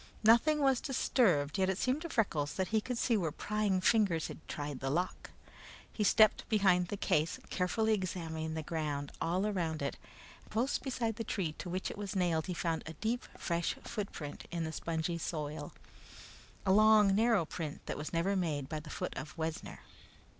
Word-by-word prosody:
Nothing 265 Hz, +8 st, +5 dB
was 270 Hz, -3 st, +3 dB
disturbed, 195 Hz, -, +2 dB
yet 190 Hz, 0 st, +3 dB
it 190 Hz, -, 0 dB
seemed 255 Hz, +7 st, 0 dB
to 335 Hz, -, -5 dB
Freckles 155 Hz, -, 0 dB
that 190 Hz, -1 st, -1 dB
he 220 Hz, -1 st, +2 dB
could 250 Hz, +2 st, -3 dB
see 235 Hz, 0 st, +2 dB
where 170 Hz, -7 st, 0 dB
prying 210 Hz, +1 st, 0 dB
fingers 190 Hz, -6 st, +3 dB
had -, -, -8 dB
tried 145 Hz, -2 st, -4 dB
the 135 Hz, -, -2 dB
lock. 175 Hz, +6 st, -2 dB, 0.6 s
He 215 Hz, -, 0 dB
stepped 215 Hz, +2 st, +4 dB
behind 190 Hz, -5 st, +4 dB
the 205 Hz, -, -4 dB
case, 155 Hz, -3 st, +1 dB
carefully 220 Hz, +4 st, +1 dB
examining 165 Hz, -5 st, -3 dB
the 160 Hz, -, -3 dB
ground 150 Hz, -3 st, -3 dB
all 180 Hz, +4 st, +1 dB
around 170 Hz, -7 st, -1 dB
it, 140 Hz, -, -2 dB, 0.4 s
and -, -, -21 dB
close 240 Hz, +6 st, +1 dB
beside 235 Hz, -5 st, -2 dB
the 225 Hz, -, -2 dB
tree 190 Hz, -6 st, -2 dB
to 180 Hz, -, -5 dB
which 185 Hz, +2 st, -2 dB
it -, -, -9 dB
was 205 Hz, -1 st, -4 dB
nailed 170 Hz, -4 st, +1 dB
he 180 Hz, -, -3 dB
found 165 Hz, -2 st, -1 dB
a 160 Hz, -, -6 dB
deep, 225 Hz, +9 st, -2 dB
fresh 170 Hz, -1 st, -1 dB
footprint 175 Hz, -8 st, -5 dB
in 170 Hz, -1 st, -2 dB
the 160 Hz, -, -3 dB
spongy 165 Hz, +1 st, -2 dB
soil 150 Hz, -2 st, -4 dB, 0.9 s
a 190 Hz, -, +3 dB
long, 215 Hz, -1 st, +6 dB
narrow 225 Hz, -4 st, +3 dB
print, 155 Hz, -2 st, -6 dB
that -, -, -3 dB
was 150 Hz, -, -5 dB
never 175 Hz, +4 st, +1 dB
made 155 Hz, -7 st, -1 dB
by 155 Hz, +1 st, -3 dB
the 150 Hz, 0 st, -11 dB
foot -, -, -4 dB
of 150 Hz, +5 st, -7 dB
Wessner. 160 Hz, 0 st, -4 dB
180 Hz, 190 wpm, -33 LUFS, 160-215 Hz, 0.9 s, long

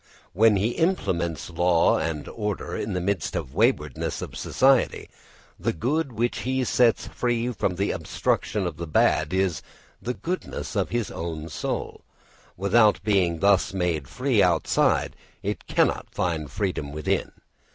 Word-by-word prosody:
When 110 Hz, +3 st, +5 dB
he 105 Hz, +5 st, 0 dB
implants 85 Hz, -, 0 dB
law 85 Hz, 0 st, +3 dB
and 80 Hz, -2 st, -3 dB
order 105 Hz, -2 st, -4 dB
in 105 Hz, -, -3 dB
the 90 Hz, -, 0 dB
midst 95 Hz, +1 st, -1 dB
of 65 Hz, -, -3 dB
the -, -, -18 dB
waywardness 105 Hz, -, 0 dB
of -, -, -8 dB
society, 135 Hz, -1 st, +2 dB, 0.5 s
the -, -, 0 dB
good 140 Hz, -, -1 dB
which 120 Hz, +2 st, -1 dB
he 130 Hz, +1 st, 0 dB
sets 120 Hz, -1 st, +3 dB
free 120 Hz, 0 st, -1 dB
from 95 Hz, -4 st, -1 dB
the 100 Hz, +3 st, 0 dB
obstruction 105 Hz, -3 st, -1 dB
of 85 Hz, -4 st, -4 dB
the 85 Hz, -, -5 dB
bad 75 Hz, 0 st, +2 dB
is 95 Hz, -3 st, 0 dB, 0.4 s
the 125 Hz, +1 st, -3 dB
goodness 180 Hz, +2 st, -4 dB
of -, -, 0 dB
his 120 Hz, -3 st, -2 dB
own 80 Hz, -1 st, -5 dB
soul: 75 Hz, -, -4 dB, 0.6 s
without 105 Hz, +3 st, +4 dB
being 90 Hz, -6 st, +1 dB
thus 100 Hz, -1 st, +3 dB
made 85 Hz, -7 st, -1 dB
free -, -, +1 dB
outside -, -, +2 dB, 0.3 s
it -, -, -4 dB
cannot -, -, +1 dB
find 80 Hz, -5 st, -2 dB
freedom 90 Hz, -, -2 dB
within. 75 Hz, +1 st, -1 dB
95 Hz, 150 wpm, -25 LUFS, 85-115 Hz, 0.6 s, When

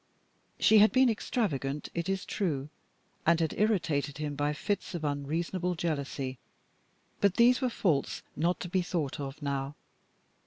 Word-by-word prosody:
She 220 Hz, 0 st, +6 dB
had 215 Hz, +1 st, +7 dB
been 260 Hz, -2 st, +5 dB
extravagant, 150 Hz, -, -2 dB
it 170 Hz, +2 st, -2 dB
is 195 Hz, -1 st, -1 dB
true, 150 Hz, -8 st, -2 dB, 0.5 s
and 170 Hz, 0 st, +4 dB
had 160 Hz, -2 st, 0 dB
irritated 155 Hz, -10 st, +1 dB
him 150 Hz, -1 st, -3 dB
by 145 Hz, +1 st, 0 dB
fits 200 Hz, +5 st, -2 dB
of 165 Hz, -, -4 dB
unreasonable 165 Hz, +5 st, -1 dB
jealousy; 140 Hz, -5 st, -3 dB, 0.8 s
but 200 Hz, -2 st, +3 dB
these 245 Hz, +3 st, +5 dB
were 255 Hz, -, +2 dB
faults 165 Hz, -, 0 dB
not 170 Hz, +3 st, +1 dB
to -, -, -4 dB
be 185 Hz, +1 st, +1 dB
thought 165 Hz, -6 st, -2 dB
of 140 Hz, +1 st, -5 dB
now. 140 Hz, 0 st, -2 dB
165 Hz, 150 wpm, -30 LUFS, 145-195 Hz, 0.8 s, had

